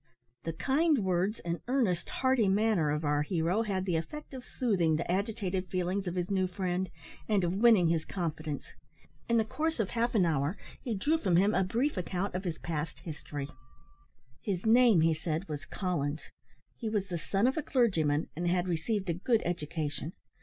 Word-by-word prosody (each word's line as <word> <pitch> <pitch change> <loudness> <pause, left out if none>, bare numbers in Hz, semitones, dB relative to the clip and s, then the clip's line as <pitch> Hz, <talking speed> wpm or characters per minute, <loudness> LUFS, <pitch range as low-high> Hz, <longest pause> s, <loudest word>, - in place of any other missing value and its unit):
The 165 - -2
kind 275 - +2
words, 185 +4 0
and 170 0 -3
earnest, 235 -10 +1
hearty 260 -5 +2
manner 200 -5 +2
of 150 +1 -1
our 145 0 +2
hero, 170 +6 +1
had 195 -4 -1
the 175 -4 +1
effect 290 - -6
of 260 -2 -7
soothing 190 - +1
the 170 +2 -2
agitated 195 -2 -1
feelings 185 +2 -1
of 175 - -2
his 180 +2 -2
new 190 -1 +2
friend, 185 0 -2 0.4
and 205 -3 +3
of 175 0 +1
winning 215 -6 +6
his 165 -1 +1
confidence. 155 -5 -4 0.6
In 235 - +4
the 220 - +3
course 315 +5 -2
of 215 - 0
half 235 0 0
an 190 -5 +5
hour, 155 +2 0 0.2
he 235 -4 -2
drew 300 +11 +1
from 185 - +2
him 200 +5 +4
a 190 - +3
brief 235 +8 0
account 180 +2 -2
of 185 +2 -3
his 170 -3 -2
past 155 -1 -4
history. 145 -3 -6 0.9
His 190 -2 -2
name, 225 -5 +6
he 165 0 +4
said, 160 +3 -3
was 150 0 -5
Collins; 155 -5 -2 0.4
he 225 - -4
was 205 -2 -1
the 175 -2 -2
son 195 +6 0
of 260 - +3
a 315 - 0
clergyman, 165 - +2
and 175 +2 -2
had 180 +1 +1
received 190 +4 -1
a 170 - +1
good 220 +7 +1
education. 160 -2 -3
185 Hz, 190 wpm, -31 LUFS, 165-220 Hz, 0.9 s, winning